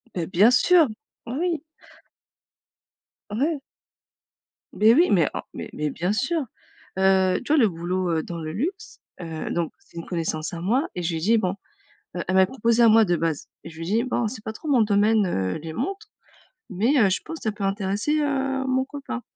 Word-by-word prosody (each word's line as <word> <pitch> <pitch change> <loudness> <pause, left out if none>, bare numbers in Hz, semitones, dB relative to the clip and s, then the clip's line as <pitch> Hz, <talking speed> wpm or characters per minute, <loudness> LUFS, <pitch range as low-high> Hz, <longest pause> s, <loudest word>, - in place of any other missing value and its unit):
Beh, 170 -2 -2
bien 200 +7 +5
sûr. 325 +4 +5 0.4
Bah 240 - -5
oui. 345 -2 0 1.7
Ouais. 280 +8 -1 1.1
Beh 220 +2 +5
oui, 345 +4 +5
mais 170 -6 +4
oh, - - -2
mais - - -7
mais 150 -1 -2
bien 180 +7 -2
sûr, 310 +8 0 0.6
heu, 190 -1 +3
tu 300 - +1
vois - - +4
le 220 - +4
boulot, 175 +2 -2
heu, 160 - -1
dans 170 -1 -6
le 155 -1 -5
luxe, 370 - -4 0.2
heu, 160 -2 -5
donc, 170 -2 -1
c'est 170 - -19
une 165 - -6
connaissance 160 -3 -3
à 170 -1 -6
moi 245 - +1
et 180 - -3
je 165 - 0
lui 165 - -2
ai - - -3
dit: 225 +6 +3
«Bon», 190 -2 -1 0.6
heu, - - -2
elle 185 - -1
m'avait 190 0 +6
proposé 235 -2 +2
à 230 - +7
moi 220 0 +6
de 175 -2 +1
base 160 -2 -2
et 165 - -9
je 160 - -14
lui 165 +1 -5
ai 210 - 0
dit: 230 +2 +2
«Bon, 245 -2 -1
c'est 215 0 -6
pas 220 - -5
trop 265 - -11
mon 260 -6 +4
domaine, 210 +1 +3
heu, 95 - -1
les 160 -1 -6
montres 390 - -4 0.6
mais 225 +10 +1
heu, 205 -6 +5
je 185 - 0
pense 325 0 -7
que - - -14
ça 220 - 0
peut 205 -1 -4
intéresser, 205 +9 0
heu, 270 -2 -1
mon 260 0 +1
copain», 275 -3 -6
210 Hz, 215 wpm, -24 LUFS, 175-265 Hz, 1.7 s, à